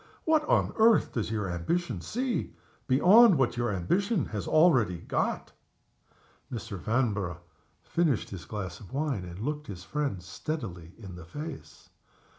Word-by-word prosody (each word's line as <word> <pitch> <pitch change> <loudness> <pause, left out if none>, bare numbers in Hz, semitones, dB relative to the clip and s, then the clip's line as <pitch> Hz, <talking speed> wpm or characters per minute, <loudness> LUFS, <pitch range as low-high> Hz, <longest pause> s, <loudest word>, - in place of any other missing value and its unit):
What 315 -1 +3
on - - +2
earth 225 0 +5
does 115 -3 -2
your 105 -3 -2
ambition 90 - -2
see, 250 +1 -2 0.3
beyond 185 - +7
what 135 -2 +1
your 120 -2 0
ambition 175 - 0
has 105 -2 -4
already 130 - +4
got?" 85 - -2 1.0
Mr. 115 -4 -5
Vanborough 100 -6 -1 0.4
finished 160 -9 0
his 90 -4 -7
glass 95 0 -5
of 100 - -13
wine, 140 -8 -1
and 90 0 -8
looked 150 +7 -4
his 90 -4 -8
friend 140 -7 -3
steadily 90 - -6
in 100 -5 -10
the 85 - -10
face. 150 - -9
120 Hz, 140 wpm, -29 LUFS, 95-160 Hz, 1.0 s, beyond